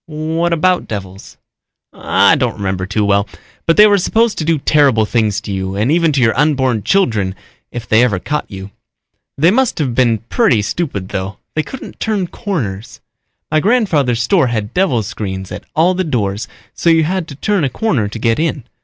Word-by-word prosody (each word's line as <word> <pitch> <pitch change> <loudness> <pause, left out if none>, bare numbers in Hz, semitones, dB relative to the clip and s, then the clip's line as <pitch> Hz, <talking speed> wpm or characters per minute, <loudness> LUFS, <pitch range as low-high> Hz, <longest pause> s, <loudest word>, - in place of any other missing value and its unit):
"What 160 +2 -2
about 180 +2 +1
devils?" 95 -2 -8 0.6
"I - - +3
don't - - -1
remember 95 -2 -3
too 105 +2 0
well, 100 0 +1 0.4
but 165 - +3
they 210 - +9
were 205 -1 +4
supposed 225 +4 +1
to - - -1
do 160 0 +1
terrible 140 -6 +3
things 105 -3 0
to 105 - -7
you 95 0 -3
and 110 +7 0
even 165 -1 +3
to 135 - +1
your 115 -2 +3
unborn 130 -6 +1
children 110 - +1 0.4
if 120 -2 -7
they 110 +2 +4
ever 110 -6 +1
caught 150 +11 -3
you. 95 0 -9 0.7
They 165 +5 +4
must 260 +3 +1
have 135 -6 -1
been 120 -2 +2
pretty 180 - +2
stupid 100 - -3
though; 95 0 -4 0.2
they 155 - 0
couldn't 265 - -10
turn 210 -4 -1
corners. 135 - -5 0.5
My 155 - +3
grandfather's 155 - +1
store 165 +2 +2
had 110 -3 -3
devil 155 - +1
screens 95 -4 -5
at - - -7
all 170 +4 +3
the 185 +1 -1
doors 110 - -2 0.3
so 170 - 0
you 165 -1 +4
had 180 +1 -2
to 140 - -9
turn 200 +4 0
a 135 - +1
corner 135 - -1
to 105 - -7
get 115 +2 0
in. 155 -5 -1
130 Hz, 190 wpm, -16 LUFS, 105-170 Hz, 0.7 s, they